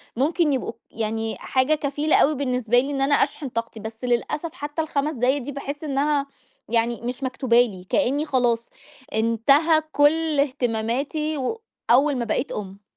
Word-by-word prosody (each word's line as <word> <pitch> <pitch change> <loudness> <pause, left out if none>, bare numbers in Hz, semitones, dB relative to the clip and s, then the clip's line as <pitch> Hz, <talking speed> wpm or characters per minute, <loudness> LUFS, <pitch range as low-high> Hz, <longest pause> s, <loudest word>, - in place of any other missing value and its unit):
ممكن 300 +3 +2
يبقوا 255 - -2 0.2
يعني 225 0 -2
حاجة 260 +4 +1
كفيلة 295 +1 0
أوي 300 +2 +4
بالنسبة 250 -3 +1
لي 275 +3 -1
إن 275 -1 -2
أنا 285 +1 +4
أشحن 280 -1 0
طاقتي، 230 -1 -4
بس 220 +3 -8
للأسف 295 +7 -1
حتى 295 +2 -4
ال5 300 -1 -1
دقايق 260 +2 +2
دي 270 +4 -6
باحس 280 +2 -6
إنها 285 0 +1 0.4
يعني 235 +1 +1
مش 250 +3 -4
مكتوبة 255 -2 +3
لي، 195 -7 -3
كأنّي 290 +1 +1
خلاص، 240 -5 +1 0.4
انتهى 275 +9 +3
كُلّ 310 +1 +3
اهتماماتي 275 +3 -1
و 440 - -3 0.3
أول 275 +3 +4
ما 240 - -2
بقيت 245 +5 -1
أم. 200 -1 -6
270 Hz, 155 wpm, -23 LUFS, 235-295 Hz, 0.4 s, أوي